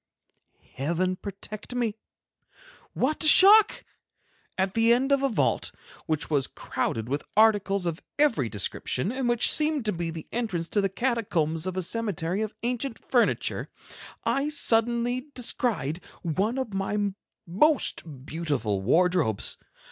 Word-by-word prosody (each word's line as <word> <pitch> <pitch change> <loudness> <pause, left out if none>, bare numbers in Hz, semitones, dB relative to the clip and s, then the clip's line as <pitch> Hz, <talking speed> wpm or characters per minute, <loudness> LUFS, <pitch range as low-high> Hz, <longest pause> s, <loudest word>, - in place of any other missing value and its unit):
Heaven 170 +7 -1
protect 205 +4 -8
me! 235 -4 -1 1.0
What 300 +5 -1
a - - +3
shock! 405 +6 +7 0.7
At 190 0 0
the 230 +1 +3
end 260 +4 +2
of 275 -1 +3
a 275 - +1
vault, 225 - 0 0.4
which 155 -1 0
was 145 -4 +1
crowded 110 0 -4
with 140 +3 -2 0.2
articles 205 -3 +3
of 170 0 -3 0.2
every 235 - +2
description 120 - -1
and 255 -1 -2
which 240 -1 +4
seemed 300 -5 +3
to 210 - +1
be 170 -2 -3
the 165 -1 -7
entrance 205 -9 -2
to 205 - +1
the 195 - 0
catacombs 190 -8 -1
of 185 0 -4
a 185 - -1
cemetery 195 -3 -2
of 220 -1 -4
ancient 245 0 -2
furniture, 245 -3 +1 0.5
I 275 +2 0
suddenly 240 -1 +1
descried 215 - 0 0.2
one 195 - -1
of 255 -6 -4
my 200 +1 -1 0.3
most 170 - +1
beautiful 145 - -2
wardrobes. 160 - +1
205 Hz, 135 wpm, -26 LUFS, 165-245 Hz, 1.0 s, shock